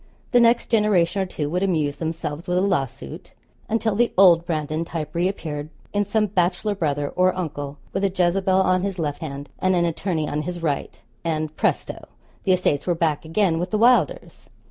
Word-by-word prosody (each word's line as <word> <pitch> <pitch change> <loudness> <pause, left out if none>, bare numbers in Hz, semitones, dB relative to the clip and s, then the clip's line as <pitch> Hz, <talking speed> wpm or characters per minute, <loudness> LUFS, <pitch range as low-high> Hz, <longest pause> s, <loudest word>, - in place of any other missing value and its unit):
The 245 - +5
next 235 0 +3
generation 200 -4 +3
or 190 - -1
two 150 -4 -3
would 180 +2 0
amuse 155 -7 0
themselves 160 -1 -4
with 180 0 +1
a - - +3
lawsuit, 140 -9 -3 0.4
until 225 -1 +1
the 235 +3 +2
old 175 -3 +6
Brandon 155 0 -1
type 155 -3 -5
reappeared 165 -4 -2 0.2
in 205 0 +1
some 215 +2 +1
bachelor 190 +2 0
brother 145 -6 -1
or 185 0 +1
uncle, 145 -5 -4 0.2
with - - -1
a 195 - +3
Jezebel 185 +1 +2
on 185 -1 +2
his 195 -1 -3
left 150 -4 -3
hand, 140 -2 -6
and 185 0 +2
an 170 -1 +2
attorney 165 -2 -1
on 150 +1 -2
his 175 +3 -5
right, 145 -4 -2 0.3
and, 155 -2 -2
presto! - - -1 0.4
the 190 - +3
estates 180 -5 0
were 175 - +2
back 160 -2 0
again 165 0 +1
with 180 +2 -2
the 215 - 0
Wylders. 250 - +2
175 Hz, 190 wpm, -23 LUFS, 155-195 Hz, 0.4 s, old